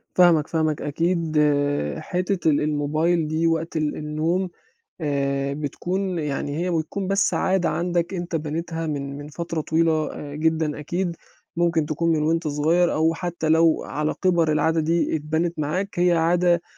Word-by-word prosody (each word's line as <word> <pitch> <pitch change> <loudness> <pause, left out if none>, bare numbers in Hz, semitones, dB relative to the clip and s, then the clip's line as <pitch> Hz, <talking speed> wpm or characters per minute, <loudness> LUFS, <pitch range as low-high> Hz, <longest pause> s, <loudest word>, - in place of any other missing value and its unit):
فاهمك، 170 -4 +5
فاهمك 155 -2 0
أكيد 165 +1 -1 0.6
حتّة 180 -2 -1
ال 145 - +2
الموبايل 155 +3 +1
دي 160 +2 +1
وقت 165 0 -1
ال 155 -1 0
النوم، 160 +5 -1 0.5
آآ، 140 -2 -1
بتكون 180 +5 -2
يعني 145 -1 -2
هي 180 +2 -1
بتكون 175 +4 -2
بس 195 0 +2
عادة 190 -2 +1
عندك 175 +1 -1
أنت 175 -2 -3
بنيتها 165 +2 -3
من 140 -2 -4
من 145 - -8
فترة 165 +1 -4
طويلة 160 0 +1
آآ 145 -1 -7
جدًا 160 -1 0
أكيد، 175 +3 -2 0.4
ممكن 170 -3 +2
تكون 165 +2 0
من 150 - 0
وأنت 160 +1 +1
صغير، 160 +4 +2
أو 160 +1 +2
حتّى 175 -2 -3
لو 160 0 +4
على 150 +1 -2
كِبَر 170 -4 +3
العادة 160 +1 +2
دي 165 +1 +1
اتبَنِت 160 +3 -2
معاك 180 +6 -2
هي 175 0 +4
عادة 170 +1 +3
160 Hz, 155 wpm, -23 LUFS, 150-175 Hz, 0.6 s, فاهمك